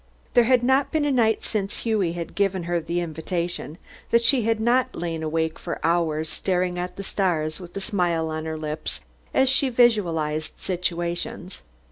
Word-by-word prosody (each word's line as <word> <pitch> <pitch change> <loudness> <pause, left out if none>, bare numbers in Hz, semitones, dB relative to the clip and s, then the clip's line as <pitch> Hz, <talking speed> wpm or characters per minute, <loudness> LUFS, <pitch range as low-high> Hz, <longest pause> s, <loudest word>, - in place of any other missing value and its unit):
There 240 -2 +6
had 250 0 +4
not 265 +2 +3
been 310 -2 +1
a 290 - +2
night 225 -4 +2
since 200 -2 -3
Hughie 210 -7 +1
had 170 -1 -5
given 195 -3 +1
her 170 0 0
the 170 +2 -2
invitation 170 -1 -3 0.3
that 235 0 +4
she 250 +2 +5
had 225 0 +1
not 250 +3 +2
lain 165 -2 -3
awake 160 0 -1
for - - -4
hours 160 -2 +1
staring 180 +1 -1
at 180 +1 -4
the 195 - -6
stars 160 -6 0
with 180 0 -9
a - - -3
smile 175 -6 0
on 155 0 -3
her 160 0 -3
lips 155 0 -4 0.3
as 265 - +3
she 270 +1 +3
visualized 170 -11 +2
situations. 175 0 -3
180 Hz, 175 wpm, -24 LUFS, 165-225 Hz, 0.3 s, There